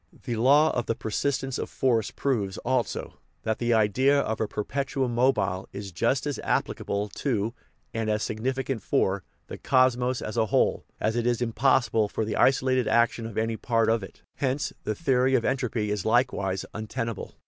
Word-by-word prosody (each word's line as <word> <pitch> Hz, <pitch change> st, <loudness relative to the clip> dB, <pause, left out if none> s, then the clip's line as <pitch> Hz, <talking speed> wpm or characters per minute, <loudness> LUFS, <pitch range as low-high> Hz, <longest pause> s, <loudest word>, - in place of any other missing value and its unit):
The 120 Hz, -, -2 dB
law 140 Hz, +7 st, +5 dB
of 120 Hz, -1 st, -2 dB
the 115 Hz, -, 0 dB
persistence 135 Hz, +4 st, -2 dB
of -, -, -4 dB
force 115 Hz, -5 st, +1 dB
proves 105 Hz, -9 st, -1 dB
also 125 Hz, -3 st, -1 dB, 0.2 s
that 110 Hz, 0 st, -1 dB
the 120 Hz, 0 st, 0 dB
idea 130 Hz, +7 st, +3 dB
of 110 Hz, -5 st, -2 dB
a 110 Hz, -, +1 dB
perpetuum 130 Hz, +3 st, -2 dB
mobile 115 Hz, -7 st, +1 dB
is 100 Hz, -1 st, -6 dB
just 115 Hz, -, 0 dB
as 145 Hz, -2 st, -2 dB
applicable 100 Hz, +1 st, -1 dB
to, 115 Hz, -2 st, -1 dB, 0.4 s
and 115 Hz, -1 st, -1 dB
as 105 Hz, 0 st, 0 dB
significant 130 Hz, +2 st, -2 dB
for, 95 Hz, -1 st, 0 dB, 0.2 s
the -, -, -8 dB
cosmos 130 Hz, -1 st, +2 dB
as 110 Hz, -, -5 dB
a 110 Hz, -, +2 dB
whole -, -, +1 dB
as 110 Hz, +1 st, 0 dB
it 120 Hz, 0 st, 0 dB
is 120 Hz, -1 st, +1 dB
impossible 120 Hz, -2 st, +2 dB
for 110 Hz, -, -2 dB
the 105 Hz, -, -2 dB
isolated 130 Hz, -2 st, +3 dB
action 115 Hz, -1 st, +2 dB
of 110 Hz, -, -9 dB
any 110 Hz, 0 st, 0 dB
part 115 Hz, -1 st, +1 dB
of 115 Hz, -1 st, +1 dB
it. 95 Hz, -, -11 dB
Hence 135 Hz, +1 st, -1 dB
the 110 Hz, -, -1 dB
theory 130 Hz, -3 st, +2 dB
of 120 Hz, -, +1 dB
entropy 120 Hz, -6 st, -1 dB
is 105 Hz, -3 st, -1 dB
likewise 110 Hz, -5 st, +1 dB
un 110 Hz, 0 st, -5 dB
tenable. 115 Hz, -3 st, -4 dB
115 Hz, 180 wpm, -26 LUFS, 110-130 Hz, 0.4 s, law